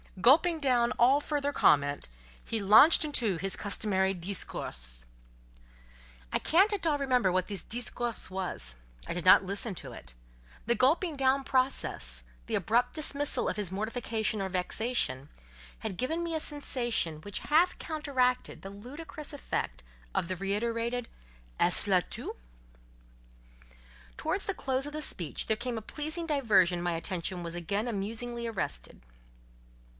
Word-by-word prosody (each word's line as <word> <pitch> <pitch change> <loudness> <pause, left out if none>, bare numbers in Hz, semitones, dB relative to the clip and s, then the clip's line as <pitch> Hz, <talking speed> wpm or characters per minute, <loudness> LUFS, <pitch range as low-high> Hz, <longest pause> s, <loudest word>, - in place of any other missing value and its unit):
Gulping 320 - +5
down 250 -4 +2
all 260 +4 +4
further 290 -1 -2
comment, 145 - +3 0.4
he 225 - -3
launched 220 +12 +7
into 230 - 0
his 195 +3 -2
customary 195 -2 +1
"discours." 65 - -6 1.3
I - - +4
can't 385 +6 +3
at 390 -4 -2
all 305 -3 +2
remember 250 -8 +2
what 185 0 0
this 200 -4 -3
"discours" 240 -1 -3
was; 180 - -2 0.3
I - - -2
did 175 0 -4
not 185 +1 +7
listen 200 +3 0
to - - -7
it: - - -9 0.5
the 235 - +2
gulping 305 +5 +2
down 270 0 +2
process, 255 - 0 0.2
the - - -1
abrupt 240 +2 +1
dismissal 290 -2 +1
of - - -2
his 200 -4 +2
mortification 220 +1 -2
or 190 - -2
vexation, 180 - -1 0.5
had 205 -5 -5
given 320 +7 -1
me 335 -1 -2
a - - 0
sensation 240 - -1
which 205 +2 -4
half 335 +4 +2
counteracted 275 -6 -1
the 195 - -7
ludicrous 290 +8 -7
effect 280 - -4 0.3
of - - -1
the 185 - -2
reiterated 230 +5 -2 0.5
"Est - - +5
ce - - -6
là - - +3
tout?" - - -6 1.8
Towards - - -1
the - - -2
close 265 +1 -1
of 295 - -8
the 305 - -3
speech 170 - -1
there 220 - +1
came 235 0 -4
a - - -4
pleasing 310 +8 -3
diversion 205 - +3
my 175 0 0
attention 175 +1 -3
was 170 0 -5
again 200 +7 -2
amusingly 235 +3 -3
arrested. - - -4
230 Hz, 145 wpm, -30 LUFS, 190-275 Hz, 1.8 s, launched